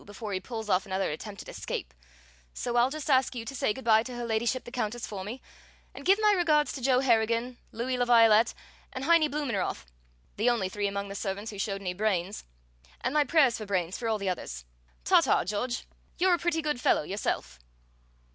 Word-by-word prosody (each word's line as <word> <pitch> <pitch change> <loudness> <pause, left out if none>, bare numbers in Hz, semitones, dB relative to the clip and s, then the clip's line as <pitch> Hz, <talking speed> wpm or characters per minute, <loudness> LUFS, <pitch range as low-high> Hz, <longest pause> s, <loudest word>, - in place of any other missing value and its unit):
before 205 0 -7
he 185 - 0
pulls 220 +2 -6
off 190 0 +1
another 190 -2 -1
attempted 200 +6 -7
escape, - - -5 0.6
so 240 - -3
I'll 240 +1 +4
just 305 +1 -6
ask 265 -2 +3
you 230 -2 -5
to 230 - -6
say 245 - 0
good 265 +4 -7
by 220 -1 +6
to 245 +2 -7
Her 240 0 -4
Ladyship 235 +3 0
the 240 - -10
Countess 240 -1 -3
for 195 -3 -6
me, 230 +7 -7 0.5
and - - -10
give 390 +2 +5
my 425 -1 +5
regards 315 -6 +3
to 270 - -6
Joe 255 0 +3
Harrigan, 235 0 +1
Louis 250 +3 -2
La 245 - +3
Violette, 230 -2 +5 0.4
and 260 - -5
Heinie 320 0 +4
Blumenroth, 270 - -2 0.5
the 220 +4 +3
only 220 -6 0
three 205 +1 -2
among 200 0 -3
the - - -5
servants 200 +2 -4
who 205 - -9
showed 195 -1 -2
any 180 -2 -3
brains, 195 -1 -1 0.6
and 255 - -1
my 300 -1 +4
prayers 280 -4 +3
for 215 - -7
brains 185 -2 -1
for 235 - -4
all 220 -1 +1
the 200 -1 -4
others. 65 - -4 0.4
Ta, - - +5
ta! - - +2
George! 225 +6 -2 0.3
You're 365 +1 +4
a 345 - +2
pretty 325 -2 0
good 295 -5 -1
fellow - - +3
yourself!" 195 - -3
230 Hz, 210 wpm, -28 LUFS, 200-260 Hz, 0.6 s, by